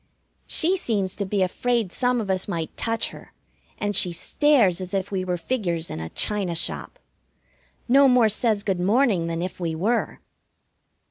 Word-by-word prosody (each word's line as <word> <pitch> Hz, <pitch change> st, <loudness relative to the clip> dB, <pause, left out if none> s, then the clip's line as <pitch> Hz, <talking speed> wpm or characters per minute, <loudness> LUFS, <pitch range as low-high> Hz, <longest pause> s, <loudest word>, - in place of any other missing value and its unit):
She 360 Hz, +4 st, +2 dB
seems 205 Hz, -, -1 dB
to 200 Hz, -, -2 dB
be 195 Hz, -1 st, +1 dB
afraid 230 Hz, +1 st, -1 dB
some 250 Hz, -1 st, +1 dB
of 205 Hz, -4 st, -2 dB
us 185 Hz, -1 st, -1 dB
might 165 Hz, -5 st, -4 dB
touch 225 Hz, 0 st, -1 dB
her, -, -, -13 dB, 0.4 s
and 205 Hz, -1 st, -2 dB
she 180 Hz, -, +2 dB
stares 200 Hz, -, +2 dB
as 185 Hz, +1 st, -5 dB
if 195 Hz, +1 st, -2 dB
we 190 Hz, -2 st, -1 dB
were 180 Hz, -1 st, -2 dB
figures 175 Hz, -6 st, -2 dB
in -, -, -5 dB
a 80 Hz, 0 st, -5 dB
china 195 Hz, -, -1 dB
shop. 165 Hz, -, -4 dB, 0.9 s
No 275 Hz, +3 st, +6 dB
more 250 Hz, -3 st, +5 dB
says 215 Hz, -1 st, +1 dB
good 190 Hz, -3 st, -1 dB
morning 200 Hz, -2 st, +2 dB
than 165 Hz, +1 st, -2 dB
if 185 Hz, -, -6 dB
we 165 Hz, -2 st, -2 dB
were. 215 Hz, +9 st, -1 dB
200 Hz, 175 wpm, -24 LUFS, 180-235 Hz, 0.9 s, No